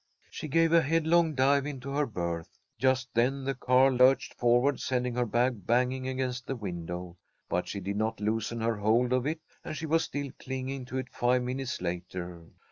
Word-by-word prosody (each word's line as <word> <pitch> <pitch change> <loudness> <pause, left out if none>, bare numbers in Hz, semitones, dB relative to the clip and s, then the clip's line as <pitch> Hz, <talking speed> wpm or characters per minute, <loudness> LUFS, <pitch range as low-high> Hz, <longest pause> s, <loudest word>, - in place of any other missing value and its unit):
She - - -6
gave 165 +3 +3
a 170 - +7
headlong 160 +1 +2
dive 140 +2 +3
into 140 -2 -6
her 145 +1 +1
berth. 85 -5 -4 0.2
Just 130 +1 +2
then 130 +4 +1
the 135 +1 -1
car 130 +1 +4
lurched 130 +1 +4
forward, 120 +4 +2
sending 125 -1 -1
her 125 0 0
bag 120 -3 0
banging 125 +2 +1
against 130 -1 -3
the 135 - -2
window, 90 -4 -6 0.3
but 90 - -1
she 100 - -4
did 100 +2 -3
not 110 0 -1
loosen 110 +2 -1
her 115 -1 0
hold 115 +4 +2
of 130 +1 +1
it, 160 +1 -2 0.2
and 155 - -5
she 160 - -4
was 165 +1 +2
still 140 -2 -4
clinging 130 0 -4
to 130 +1 -5
it 130 -1 -4
five 125 +1 +2
minutes 130 -1 -3
later. 85 -1 -5
125 Hz, 190 wpm, -29 LUFS, 110-135 Hz, 0.3 s, a